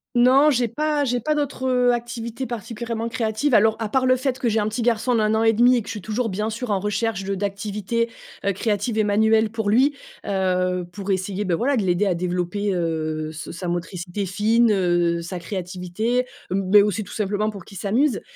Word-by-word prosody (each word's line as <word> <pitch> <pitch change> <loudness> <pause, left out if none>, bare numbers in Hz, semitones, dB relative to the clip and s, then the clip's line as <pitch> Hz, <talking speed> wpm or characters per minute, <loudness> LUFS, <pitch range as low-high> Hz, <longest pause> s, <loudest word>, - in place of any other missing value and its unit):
Non, 265 +5 +6
j'ai 245 -3 +1
pas 295 +4 0
j'ai 245 -1 0
pas 305 +7 0
d'autres, 285 -3 -2
heu, 250 -1 +3
activités 240 +1 -4
particulièrement 230 0 -4
créatives, 230 +3 0
alors, 220 +1 +5
à 220 -2 -2
part 260 +1 +1
le 255 - +5
fait 255 0 -1
que 240 - -1
j'ai 220 0 +2
un 210 - 0
petit 225 +3 -2
garçon 235 +1 +1
d'1 215 -1 +2
an 220 - +2
et 225 - +4
demi 245 +3 +5
et - - 0
que - - -12
je - - -4
suis 210 - -6
toujours, 220 +3 -1
bien 210 +4 -2
sûr, 235 +2 -5
en 200 -2 +1
recherche 210 0 -1
de 195 - -2
d'activités, 205 +3 -2 0.3
heu, 200 - +2
créatives 215 +2 -1
et - - +4
manuelles 220 +1 +3
pour 220 -2 -1
lui, 270 +6 +4 0.3
heu, 185 -2 0
pour 200 0 -7
essayer, 190 +2 -1
ben, 180 -3 +1
voila, 260 +8 +1
de - - +2
l'aider 180 +2 +1
à 190 - +2
développer, 180 +3 -1
heu, 155 -2 -2
se 160 0 -7
sa 180 +1 -6
motricité 175 +2 -3
fine, 220 +5 +3
heu, 175 -3 +1
sa 175 +1 -5
créativité, 185 +7 -2 0.2
heu, - - +1
mais 200 +2 +6
aussi, 210 +1 -1
tout 200 - -11
simplement, 210 0 -1
pour 200 -4 -9
qu'il 195 - -11
s'amuse, 235 +5 +1
215 Hz, 215 wpm, -23 LUFS, 190-235 Hz, 0.3 s, Non